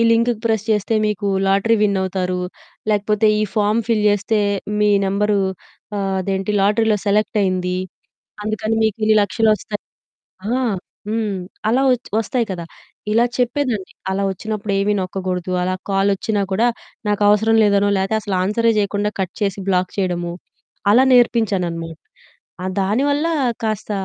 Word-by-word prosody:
Link 230 +1 +3
press 220 -2 +1
చేస్తే 210 +1 +1
మీకు 210 -1 -2 0.2
lottery 200 +4 +3
విన్నవుతారు, 190 -2 0 0.5
లేకపోతే 210 +1 +2
ఈ - - +2
ఫామ్ 210 +1 +2
ఫిల్ 225 -2 +2
చేస్తే 205 +2 +1 0.4
మీ 210 0 +4 0.2
నెంబరు 205 +1 +1 0.6
ఆహ్, 195 -1 -1
అదేంటి 195 +1 -2
లాటరీలో 210 +2 +3
సెలెక్టైయింది, 190 -3 +1 0.7
అందుకని 215 +1 -1
మీకు 220 -1 +1
ఇన్ని 215 0 +4
లక్షలొస్తాయి 215 +1 0 0.8
ఆ! - - -1 0.5
హ్మ్. 215 -2 -1 0.3
అలా 255 +4 +3
వచ్ 250 0 -1
వస్తాయి 230 +1 -1
కదా! 170 -2 -5 0.5
ఇలా 230 +2 +4
చెప్పేదాన్ని. 245 -5 -1 0.2
అలా 195 +1 -1
వచ్చినప్పుడు 210 +2 -4
ఏమి 200 +1 +1
నొక్కకూడదు, 185 -1 -3
అలా 185 +1 0 0.2
కాలొచ్చినా 200 +2 +1
కూడా, 220 +5 +2 0.4
నాకు 205 0 0
అవసరం 220 +2 +4
లేదనో, 200 -1 +3
లేతే 195 +3 0
అసలు 200 -2 -3
ఆన్సరే 230 +4 +2
చేయకుండా 205 0 0
కట్ 185 -1 -3
చేసి, 200 -1 0
బ్లాక్ 180 -1 +1
చేయడము. 175 -3 -1 0.6
అలా 255 +4 +6
నేర్పించాననమాట. 180 -9 +1 0.7
ఆ - - -1
దానివల్ల 280 +10 +1 0.4
కాస్త 215 -1 -2
205 Hz, 130 wpm, -20 LUFS, 190-220 Hz, 0.8 s, అలా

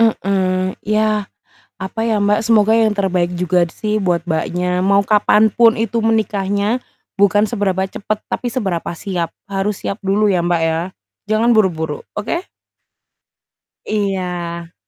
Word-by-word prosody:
Mhm, 190 -4 +1
ya, 215 -1 0 0.5
apa 190 +4 -5
ya, 220 -2 +2
Mbak, 210 +1 +3
semoga 220 -1 +4
yang 220 -2 +3
terbaik 180 -3 0
juga 175 -1 +1
sih 215 -1 -1
buat 175 -2 0
Mbaknya, 180 +2 -1
mau 200 +1 +3
kapan 210 +1 +4
pun 230 -1 +5
itu 225 +1 -1
menikahnya, 210 0 0 0.4
bukan 200 +1 +4
seberapa 200 -4 -1
cepet 210 +2 -3
tapi 250 - -2
seberapa 195 -11 -2
siap, 175 -3 -3 0.2
harus 195 +1 -2
siap 200 - -3
dulu 200 +1 +2
ya, 180 - +2
Mbak, 175 -1 +1
ya, 165 0 +1 0.5
jangan 225 +2 +3
buru-buru, 165 -8 +1
oke? 335 - -3 1.4
Iya. 180 -5 -3
200 Hz, 135 wpm, -18 LUFS, 180-215 Hz, 1.4 s, pun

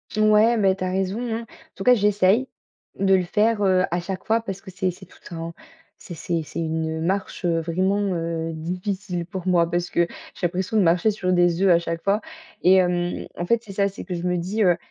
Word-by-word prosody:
Ouais, 215 +2 +4
mais 195 -4 +3
tu 190 - -5
as - - -1
raison, 190 +3 -1 0.2
hein. 230 - -3
En - - -10 0.3
tout 195 - -6
cas, 250 - +6
j'essaye 210 +2 +3 0.5
de 195 -1 +3
le 185 -1 +4
faire, 215 +4 +1
heu, 185 -2 +3
à 175 - 0
chaque 185 +1 -6
fois 225 +1 +2
parce 195 -3 -6
que 190 - -11
c'est 185 0 -1
c'est 190 +2 -14
tout 180 - -21 0.2
un 165 0 -5 0.4
c'est 180 - -10
c'est 165 +1 -2
c'est 155 - -7
une 160 0 -2
marche, 190 +4 -2
heu, 170 -2 +1
vraiment, 185 +5 0
heu, 165 -1 -3
difficile 180 +2 -4
pour 185 0 -7
moi 170 -2 +3
parce 175 0 -1
que 170 0 +1 0.3
j'ai 175 - 0
l'impression 185 +5 -2
de - - +5
marcher 175 +4 +3
sur 185 -3 -1
des 175 0 +3
œufs 195 - +4
à 170 -1 +6
chaque 165 -1 -4
fois 200 +2 +1 0.4
et 185 +2 +6
hem, 175 -1 +1
en 175 - -2
fait, 235 +5 +2
c'est 205 -4 -10
ça, 200 0 +1
c'est 195 - -9
que 180 - -4
je 170 - -5
me 180 0 0
dis, 195 +6 -1
heu: 175 -3 +4
185 Hz, 235 wpm, -23 LUFS, 170-200 Hz, 0.5 s, cas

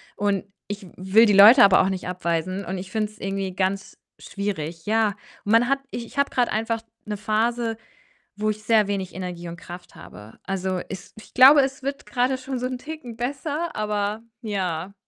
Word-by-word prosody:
und 200 -2 0 0.2
ich 205 -1 -6
will 190 +5 +4
die 210 - +3
Leute 220 +6 +9
aber 195 -2 +7
auch 190 - +1
nicht 185 -1 -4
abweisen 180 +2 -2
und 190 +2 -4
ich 190 +1 -8
finde 215 0 -1
es 215 - -20
irgendwie 195 -1 -3
ganz 195 +1 -2 0.2
schwierig. 170 -5 -5
Ja, 215 -1 +2 0.3
man 230 +4 +4
hat 275 0 +2
ich 235 - -5
ich 255 - -15
habe 280 - +2
grad 245 -1 +1
einfach 225 +1 -1 0.2
'ne 210 -1 -4
Phase, 225 +2 0 0.6
wo 215 +1 0
ich 215 0 -7
sehr 215 -2 +4
wenig 190 -3 -3
Energie 180 -2 -6
und 170 - -8
Kraft 175 +1 -11
habe. 105 +2 -13
Also, 190 -1 -2
es 190 -1 -8
ich 215 - -14
glaube, 275 +3 +8
es 270 +1 -2
wird 275 0 -4
grade 255 +1 0
schon 260 -1 -5
so 250 - -1
'n 255 -1 -4
Ticken 260 -5 -8
besser, 285 +6 -3
aber, 210 0 -2 0.2
ja. 190 -3 -3
210 Hz, 190 wpm, -24 LUFS, 190-240 Hz, 0.6 s, Leute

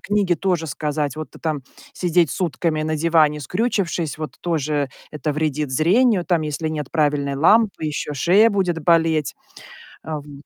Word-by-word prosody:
книги 200 -3 +1
тоже 175 -3 -1
сказать. 150 -1 -2
Вот 155 - -6
ты - - -15
там 155 -4 -3 0.3
сидеть 175 -3 +1
сутками 165 -3 -1
на 155 0 -1
диване, 155 -2 +3
скрючившись, 180 - -1
вот 155 -5 -5
тоже 150 -4 -1 0.2
это 150 0 -3
вредит 150 -2 -1
зрению. 185 - +3
Там, 170 -4 +1
если 155 +1 -3
нет 150 -3 -4
правильной 145 -3 0
лампы, 200 +4 +3
ещё 150 0 -3
шея 190 - +4
будет 180 -6 -1
болеть. 160 -3 +2 0.7
А, 155 -2 -4
в 145 - -16
м 145 0 -12
155 Hz, 160 wpm, -21 LUFS, 150-175 Hz, 0.7 s, шея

